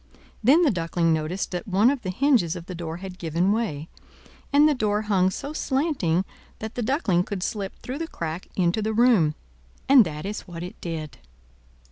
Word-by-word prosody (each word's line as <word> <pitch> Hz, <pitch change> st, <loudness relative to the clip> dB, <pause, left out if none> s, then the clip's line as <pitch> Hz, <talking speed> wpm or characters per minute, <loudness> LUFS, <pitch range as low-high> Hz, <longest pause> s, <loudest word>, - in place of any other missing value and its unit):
Then 290 Hz, +10 st, +6 dB
the 300 Hz, -, +4 dB
Duckling 165 Hz, -2 st, +1 dB
noticed 160 Hz, +5 st, -2 dB
that 180 Hz, +2 st, -4 dB
one 205 Hz, +6 st, +4 dB
of 280 Hz, -3 st, -3 dB
the 190 Hz, -, -4 dB
hinges 225 Hz, -, +2 dB
of 170 Hz, -2 st, -7 dB
the 185 Hz, -, -7 dB
door 165 Hz, -1 st, -5 dB
had 185 Hz, 0 st, -9 dB
given 170 Hz, +4 st, +1 dB
way, 200 Hz, -9 st, -2 dB, 0.6 s
and 290 Hz, +1 st, +6 dB
the 305 Hz, -, +3 dB
door 210 Hz, -4 st, 0 dB
hung 190 Hz, -3 st, +2 dB
so 280 Hz, +9 st, -6 dB
slanting 265 Hz, -, 0 dB, 0.3 s
that 220 Hz, 0 st, -6 dB
the 245 Hz, -, -3 dB
Duckling 215 Hz, -, +1 dB
could 185 Hz, -1 st, -4 dB
slip 200 Hz, -2 st, -3 dB
through 260 Hz, +4 st, -7 dB
the 330 Hz, -, -3 dB
crack 165 Hz, -, -5 dB
into 180 Hz, +3 st, +1 dB
the 220 Hz, +1 st, -1 dB
room; 215 Hz, -10 st, +4 dB, 0.5 s
and 270 Hz, -3 st, +8 dB
that 155 Hz, -2 st, -6 dB
is 205 Hz, +1 st, -5 dB
what 170 Hz, -1 st, -7 dB
it 180 Hz, -, -9 dB
did. 155 Hz, -6 st, -5 dB
190 Hz, 190 wpm, -25 LUFS, 170-240 Hz, 0.6 s, and